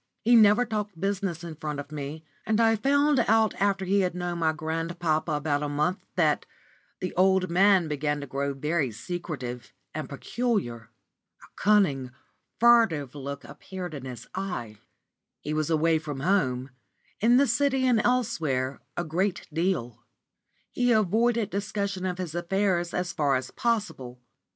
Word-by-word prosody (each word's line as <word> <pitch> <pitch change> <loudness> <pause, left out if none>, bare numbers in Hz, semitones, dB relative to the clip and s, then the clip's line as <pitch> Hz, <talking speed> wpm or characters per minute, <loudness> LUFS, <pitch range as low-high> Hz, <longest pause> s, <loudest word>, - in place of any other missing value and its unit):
He 240 +2 +5
never 215 +2 +6
talked 210 -5 -4
business 195 -3 -2
in 170 -2 -6
front 150 -2 -5
of 145 +1 -8
me, 150 +2 -6 0.2
and 220 0 +1
I 225 -1 +4
found 285 +4 +3
after 205 -4 +2
he 200 +2 +2
had 180 -2 0
known 175 -1 -3
my 160 -1 +2
grandpapa 160 0 -2
about 145 0 0
a 150 - -2
month 150 +6 -1
that - - +2 0.5
the 185 - -3
old 185 -1 +3
man 190 -1 +4
began 150 0 -1
to - - -5
grow 140 +1 -2
very 150 0 0
secretive 125 -1 -6 0.2
and 155 0 -5
peculiar. 140 - -2 0.5
A - - -14
cunning 185 -11 +2 0.5
furtive 225 - +4
look 140 0 -6
appeared 180 +7 -8
in 135 -3 -7
his 125 -3 -8
eye; 175 - -5 0.6
he 150 - -3
was 155 0 0
away 160 0 +3
from 145 -3 -6
home 135 -7 +1 0.5
in 235 +3 +5
the 280 - +5
City 265 +1 +1
and 240 -4 +4
elsewhere 160 - 0 0.2
a 175 - 0
great 175 +3 -1
deal; 130 - -1 0.7
he 245 0 +1
avoided 220 +1 +2
discussion 200 -2 -2
of 180 -1 -3
his 180 -4 -4
affairs 175 0 0
as 180 0 -2
far 145 -4 +2
as 130 0 -3
possible. 200 - -2
175 Hz, 150 wpm, -27 LUFS, 145-205 Hz, 0.7 s, never